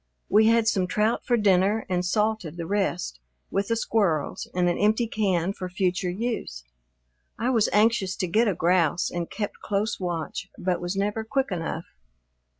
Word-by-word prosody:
We 215 +2 +5
had 230 0 +4
some 190 -5 +2
trout 215 +5 +1
for 240 - +3
dinner 205 +1 +3
and 180 -2 0
salted 210 -3 0
the 170 - -4
rest 180 - -1 0.3
with 200 0 0
the 230 - +1
squirrels 200 -9 0
in 180 0 +1
an 175 - +2
empty 220 +3 +3
can 195 -5 0
for 185 -2 -6
future 180 -1 0
use. 190 - -3 0.7
I 240 +4 0
was 225 -4 +3
anxious 210 -3 +2
to 185 - -2
get 220 +7 +3
a 200 - +1
grouse 170 0 +2
and 175 -1 -3
kept 205 -2 -4
close 205 +2 -1
watch, 175 +1 -4
but 180 -1 -1
was 175 +2 -3
never 205 +3 -1
quick 265 +2 -1
enough. 165 -2 -3
195 Hz, 170 wpm, -25 LUFS, 180-220 Hz, 0.7 s, We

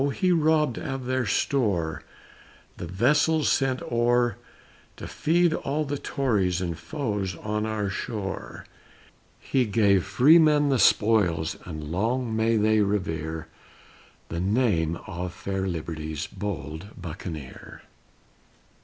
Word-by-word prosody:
he 185 +6 +1
robbed 155 -5 +2
of 135 -2 -4
their 130 -2 0
store 100 - 0 0.8
The 85 - -6
vessels 150 - +2
sent 130 -1 +1
o'er 120 -1 +2 0.6
To - - -7
feed 170 +1 +2
all 150 0 -2
the 145 0 -3
Tories 100 -10 0
and 85 -2 -3
foes 105 - -3
on 105 +4 -3
our 110 -2 -2
shore, 100 0 -5 0.7
He 130 -3 0
gave 100 -3 +3
freemen 150 - +5
the 135 -3 +2
spoils 100 -10 +3
and 80 -1 -6
long 115 +5 -1
may 110 +1 +2
they 110 0 +3
revere 80 -6 -2 0.8
The 85 - -3
name 95 -5 +1
of 90 -1 -5
fair 95 +1 -3
Liberty's 80 -3 -4
bold 90 -1 -6
Buccaneer. 80 -5 -8
105 Hz, 115 wpm, -26 LUFS, 90-130 Hz, 0.8 s, freemen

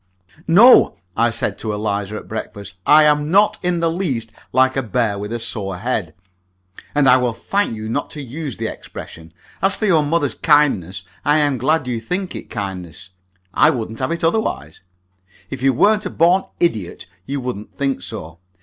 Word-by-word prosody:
"No," 210 +10 +7 0.2
I 115 +1 +3
said 115 - -1
to 110 -2 -3
Eliza 105 -1 -2
at - - -8
breakfast, 105 -2 -7
"I 155 +1 +7
am 150 0 +2
not 200 +4 +3
in 175 -2 -1
the 165 -1 +1
least 135 - -2 0.2
like 130 +1 +3
a 135 - +1
bear 110 -3 -1
with 105 +1 -6
a 120 - -2
sore 100 -5 -5
head, 100 -7 -3 0.8
and 145 -2 +3
I 125 - +7
will 125 -2 0
thank 200 - -1
you 110 0 -6
not 140 +6 -2
to 145 - -5
use 135 - -6
the - - -4
expression. 80 0 -9 0.3
As 195 +2 +3
for 220 - -2
your 170 -6 +4
mother's 150 -1 0
kindness, 100 - +2 0.2
I 150 +1 +3
am 145 -4 +1
glad 150 +3 +1
you 120 -2 -3
think 180 - -3
it - - -8
kindness. 90 -4 -6 0.4
I - - +5
wouldn't 115 -6 -3
have 130 - -1
it 170 0 -3
otherwise. 165 - -1 0.7
If 135 - -5
you 135 0 +4
weren't 210 - +2
a - - -5
born 175 +4 +3
idiot 110 - -1 0.2
you 140 +1 -2
wouldn't 125 -5 -6
think 135 -7 -1
so. 80 -2 -8
130 Hz, 185 wpm, -19 LUFS, 105-160 Hz, 0.8 s, No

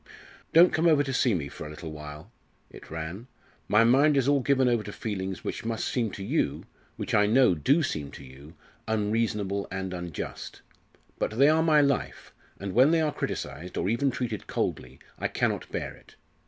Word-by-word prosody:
"Don't 170 +2 +6
come 165 +2 +2
over 150 -3 +5
to 135 -1 -4
see 125 -4 +2
me 75 -5 -3
for 70 - -8
a - - -9
little 80 +1 -8
while," 75 0 -9 0.4
it - - -13
ran. 80 +8 -6 0.4
"My 105 +2 +5
mind 140 +5 +4
is 135 -1 +2
all 145 0 +4
given 130 0 +2
over 120 -2 +2
to 105 - -7
feelings 95 -3 -4
which - - -4
must 115 0 -2
seem 120 -4 0
to 100 - -6
you - - -1 0.3
which, - - -5
I 105 -1 +4
know, 125 -2 +5
do 140 - +2
seem 75 - -3
to - - -10
you 70 +4 -14 0.3
unreasonable 105 -2 -1
and 95 0 -4
unjust. 85 -3 -6 0.6
But 110 - -2
they 140 +3 +6
are 160 +1 +4
my 155 -2 +5
life, 140 -2 -1 0.3
and 95 -1 -5
when 130 +4 +6
they 165 0 +3
are 150 -2 0
criticised, 85 +5 -5
or - - 0
even 120 +5 +1
treated 120 -5 -4
coldly, 65 +1 -3 0.2
I - - 0
cannot - - -1
bear - - -4
it. - - -19
110 Hz, 195 wpm, -27 LUFS, 90-135 Hz, 0.6 s, Don't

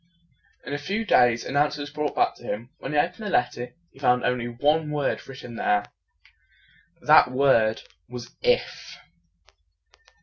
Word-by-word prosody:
In 140 - -5
a 145 - -2
few 200 +10 -3
days, 120 - +3
an 135 - -5
answer 150 +1 +2
was 145 0 -6
brought 150 0 -3
back - - +2
to - - -17
him. 115 +5 -5
When 135 - -6
he 150 - 0
opened 180 +8 0
the 210 - -3
letter, 120 -5 -1 0.2
he - - -19
found 125 -2 +2
only 125 -1 0
one 150 +6 +1
word 150 -2 -2
written 130 -3 -9
there. 105 -2 +1 1.2
That - - +6
word 125 -4 +2 0.3
was 120 -1 -9
"IF." - - -1
135 Hz, 160 wpm, -25 LUFS, 120-150 Hz, 1.2 s, That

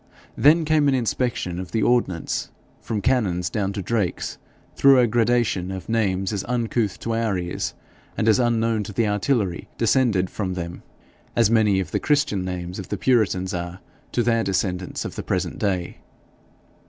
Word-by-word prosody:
Then 155 +3 +5
came 155 -1 +3
an 135 - +3
inspection 120 -7 -1
of 90 -1 -7
the 110 - +1
ordnance, 115 -9 0 0.3
from 110 -2 -3
cannons 95 -8 +1
down 100 -2 -1
to 100 -1 -4
drakes, 105 -4 -2 0.4
through 140 -1 +6
a 125 - +5
gradation 115 -5 +1
of 95 -1 -6
names 100 -3 0
as 100 - -2
uncouth 115 -4 -1
to 115 - -2
our 115 -4 0
ears, 90 -1 -3 0.4
and - - 0
as 110 +2 +5
unknown 115 -2 +1
to 105 - -7
the 115 +1 +1
artillery 105 -3 0
descended 115 -6 +2
from 95 -3 -3
them, 85 -1 -5 0.5
as 115 -2 +3
many 105 -4 +4
of 95 - -3
the - - 0
Christian 140 -10 +1
names 90 +1 -5
of 95 - -8
the 105 - -2
puritans 95 -6 +1
are 85 +1 -4 0.3
to 120 - +2
their 115 -1 +2
descendants 95 -2 -2
of - - -5
the - - -5
present - - -2
day. 95 -4 -1
105 Hz, 170 wpm, -23 LUFS, 95-120 Hz, 0.5 s, through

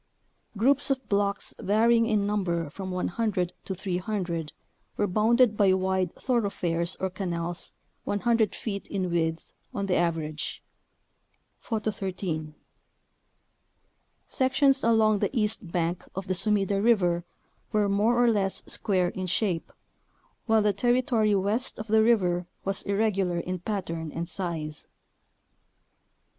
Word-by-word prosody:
Groups 275 +7 +3
of 265 -2 -1
blocks 200 0 0
vary 225 +4 +3
ing 230 0 +2
in 210 -3 +1
number 175 -7 -1
from 190 +2 -6
100 185 0 -1
to 190 - -3
300 180 -3 -3 0.5
were 205 - +2
bounded 220 +4 +3
by 200 -2 +4
wide 190 -1 0
thoroughfares 185 -8 -1
or 190 -1 -1
canals 175 -2 -4 0.3
100 220 +1 +1
feet 200 -3 -5
in 185 -3 -2
width 165 -1 0 0.3
on 200 - -1
the 190 - 0
average 160 -3 -2 1.0
(Photo 220 -2 -2
13). 180 -6 -4 1.7
Sections 270 0 +2
along 220 -2 +4
the - - +1
east 210 -4 -1
bank 170 0 -1
of 190 0 -4
the 185 - +1
Sumida 200 0 +1
River 180 -7 +3 0.5
were 210 -1 +2
(more 220 +5 +3
or - - +4
less) 195 -3 0
square 185 -4 0
in 185 +1 -5
shape, 180 -2 -1 0.8
while 220 -1 +4
the 210 -1 +3
territory 240 -1 +2
west 205 +6 0
of 215 - -5
the 220 0 +4
river 180 -6 +2 0.2
was 195 0 -1
irregular 195 -3 0
in 180 +1 -3
pattern 165 -5 -4
and 170 +2 -4
size. 165 -5 -4
195 Hz, 125 wpm, -27 LUFS, 175-220 Hz, 1.7 s, by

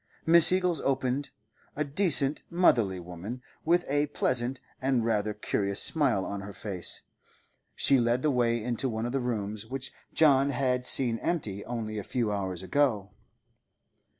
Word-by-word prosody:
Mrs. 165 +1 +7
Eagles 180 -4 +1
opened, 135 +1 -1 0.5
a 150 - 0
decent, 145 -2 +1
motherly 115 - +2
woman, 90 +8 -8 0.2
with 175 +2 +2
a 145 +2 +1
pleasant 130 -2 -1 0.2
and 130 -3 +1
rather 105 -2 0
curious 100 -1 -2
smile 145 -11 +1
on 100 -1 -5
her 100 +1 -8
face. 95 -5 -5 0.7
She 135 -2 +4
led 120 +1 +1
the 150 - +2
way 120 -3 +1
into 125 +2 -1
one 110 0 -3
of 120 - -3
the 135 - 0
rooms 110 -4 -4
which 135 0 -5 0.2
John 140 -3 +4
had 125 -2 0
seen 120 -4 +3
empty 105 - -2
only 110 -3 -4
a - - -5
few 115 -2 -1
hours 95 -3 -3
ago. 110 -3 0
125 Hz, 150 wpm, -28 LUFS, 105-140 Hz, 0.7 s, Mrs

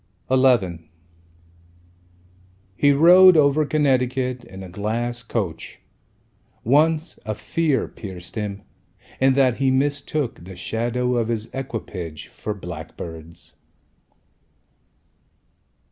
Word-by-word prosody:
XI 100 -12 +2 1.9
He 145 +6 +4
rode 175 +5 +7
over 145 0 +3
Connecticut 130 -4 0
In 95 0 -10
a - - -8
glass 115 +6 -3
coach. 105 -8 -4 0.9
Once, 155 +6 +2
a 110 0 -3
fear 135 +7 0
pierced 90 -5 -9
him, 105 -2 -4 0.6
In 130 0 +4
that 130 -3 +3
he 135 0 +2
mistook 140 - -1
The 95 +1 -10
shadow 120 +6 -1
of 115 -2 0
his 115 -1 -4
equipage 100 - -6
for 105 - -5
blackbirds. 85 -1 -9
120 Hz, 95 wpm, -22 LUFS, 100-135 Hz, 1.9 s, rode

